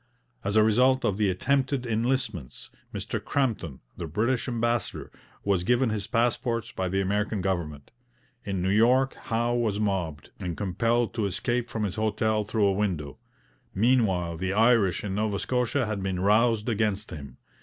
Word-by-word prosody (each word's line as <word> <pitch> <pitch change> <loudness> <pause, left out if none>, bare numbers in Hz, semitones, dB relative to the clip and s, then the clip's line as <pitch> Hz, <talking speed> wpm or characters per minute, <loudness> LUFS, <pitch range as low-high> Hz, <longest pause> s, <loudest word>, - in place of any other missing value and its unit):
As 100 +1 -2
a 110 - +6
result 125 +5 +3
of 100 - +1
the 105 -2 +3
attempted 130 +6 0
enlistments, 115 - -2 0.2
Mr - - -4
Crampton, 110 - -1 0.2
the 85 - -4
British 115 - 0
ambassador, 120 -2 -1 0.3
was 100 -3 +1
given 120 +3 +2
his 105 -2 -3
passports 115 0 0
by 95 -6 -2
the 95 +2 0
American 105 +2 0
government; 85 -7 -3 0.5
in 95 -3 -2
New 95 - +1
York 125 +6 +4
Howe 120 +1 -1
was 110 -4 0
mobbed, 90 -8 -2
and 85 -3 -4
compelled 115 +4 0
to 110 -3 -1
escape 120 +6 -1
from 110 -2 -3
his 100 -1 -3
hotel 110 0 +1
through 105 0 +1
a 100 - +3
window. 90 -9 -2 0.6
Meanwhile, 95 -7 +2
the 95 +2 -2
Irish 110 -4 +3
in 100 -2 -3
Nova 105 0 0
Scotia 125 +5 0
had 105 -2 -3
been 95 -1 -2
roused 110 +3 +3
against 105 -2 0
him. 70 -4 -9
105 Hz, 160 wpm, -27 LUFS, 95-120 Hz, 0.6 s, a